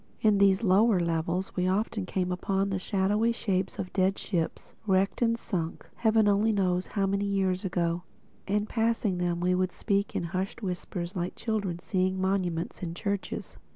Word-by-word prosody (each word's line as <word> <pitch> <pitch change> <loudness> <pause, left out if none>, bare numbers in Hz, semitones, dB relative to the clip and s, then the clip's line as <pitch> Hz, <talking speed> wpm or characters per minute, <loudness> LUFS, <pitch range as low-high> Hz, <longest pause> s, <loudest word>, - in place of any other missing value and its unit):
In 210 -2 +4
these 200 +1 +4
lower 205 +1 +4
levels 170 +2 -1
we 180 0 +1
often 205 0 0
came 180 -1 -1
upon 195 +2 0
the 190 - 0
shadowy 205 +4 +1
shapes 195 -5 -1
of 185 -2 -5
dead 190 0 +2
ships, 170 -5 -3
wrecked 195 +3 +2
and 230 -1 +3
sunk 170 -7 -4
Heaven 220 -2 +3
only 205 +2 +3
knows 185 -3 +1
how 200 -2 0
many 200 +1 0
years 190 -2 0
ago; 175 -2 0 0.5
and 210 +1 +1
passing 225 -5 0
them 175 -1 0
we 180 +1 +2
would 185 0 +1
speak 200 0 -1
in - - 0
hushed 185 +5 -3
whispers 180 0 -4
like 180 0 -2
children 205 -6 -2
seeing 185 +1 0
monuments 185 -3 -1
in 170 -2 -4
churches. 200 0 -4
190 Hz, 170 wpm, -28 LUFS, 180-205 Hz, 0.5 s, In